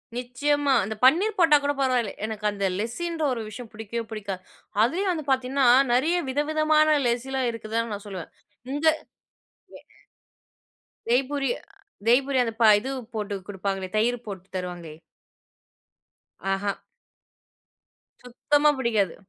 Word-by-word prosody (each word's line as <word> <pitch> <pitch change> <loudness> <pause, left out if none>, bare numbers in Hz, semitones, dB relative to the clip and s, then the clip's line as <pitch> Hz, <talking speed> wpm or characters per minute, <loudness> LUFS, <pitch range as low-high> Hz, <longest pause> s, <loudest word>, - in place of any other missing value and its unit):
நிச்சயமா, 275 +3 0
அந்த 215 +3 -4
பன்னீர் 395 +10 +4
போட்டாக் 300 -5 +5
கூட 285 0 +1
பரவாயில்ல. 255 -5 +1
எனக்கு 215 -1 -5
அந்த 200 -1 -2
லெசின்ற 320 +9 -3
ஒரு 230 - -4
விஷயம் 230 +2 -9
புடிக்கவே 225 +2 -5
புடிக்காது. 200 -4 -5 0.4
அதுலயும் 365 - +2
வந்து 310 -3 -5
பார்த்தீங்கன்னா, 260 0 +2 0.3
நெறைய 310 +8 +2
வித 285 +3 0
விதமான 310 0 +4
லெசில்லாம் 250 +1 -1
இருக்குதுன்னு 230 0 -3
நான் 205 +1 -7
சொல்லுவேன். 185 -4 -7 0.4
இந்த 295 +2 0 0.9
யஹ் - - -15 1.2
தெய்பூரி 275 +2 +1
அ - - -20 0.5
தெய்பூரி. 265 +3 +3
அந்த 230 -2 -3
ப - - +6
இது 265 +5 -5 0.2
போட்டு 210 -1 -3
குடுப்பாங்களே, 195 -1 -3
தயிரு 240 +3 +2
போட்டு 195 -3 -8
தருவாங்களே? 175 -4 -6 1.6
ஆஹா. 200 +1 -2 1.5
சுத்தமா 290 +4 +2
புடிக்காது. 220 -8 0
245 Hz, 120 wpm, -25 LUFS, 210-285 Hz, 1.6 s, ப